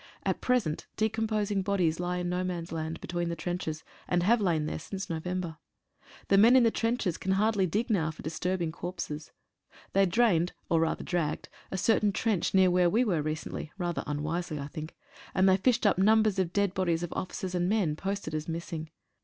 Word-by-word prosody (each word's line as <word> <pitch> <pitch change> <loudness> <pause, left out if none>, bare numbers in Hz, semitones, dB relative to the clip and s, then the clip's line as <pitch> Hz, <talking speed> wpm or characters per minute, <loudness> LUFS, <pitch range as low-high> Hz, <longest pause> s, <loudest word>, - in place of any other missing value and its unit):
At - - 0
present 240 -12 0
decomposing 215 -2 0
bodies 185 -5 +1
lie 180 0 -1
in 180 0 -2
no 180 +1 -1
man's 175 -2 -4
land 160 0 -3
be - - -7
tween 175 0 -1
the 170 - -2
trenches, 165 -1 -4 0.2
and 175 -1 +1
have 225 +4 +4
lain 165 -6 +1
there - - -3
since 195 -3 -6
November. 170 0 -3 0.7
The 195 - +5
men 230 +5 +7
in 255 - +7
the 230 - +4
trenches 225 -7 0
can 190 - 0
hardly 200 -1 +2
dig 210 +8 0
now 165 -7 +2
for 155 - -9
disturb 180 +3 -1
ing 160 - -1
corpses. 165 -3 -6 0.6
They 195 0 +4
drained, 180 -4 +2 0.2
or 165 - +4
rather 160 0 0
dragged 170 -4 -2 0.2
a 190 - -3
certain 210 +1 +3
trench 205 -3 0
near 190 -1 +5
where 180 -1 +4
we 230 +8 +3
were 175 -8 +1
recently 155 0 -4
(rather 175 -3 -2
unwisely, 155 +3 -2
I 140 0 -5
think) 155 +2 -7 0.4
and 190 0 +4
they 190 - +6
fished 240 +3 +2
up 200 -3 +4
numbers 215 0 +4
of 180 -3 0
dead 200 -1 +1
bodies 175 -3 0
of 175 - -4
officers 185 0 -4
and 175 0 +1
men 195 -8 +1
posted 195 -2 -4
as 155 0 -3
missing. 165 -1 -4
180 Hz, 200 wpm, -29 LUFS, 165-200 Hz, 0.7 s, men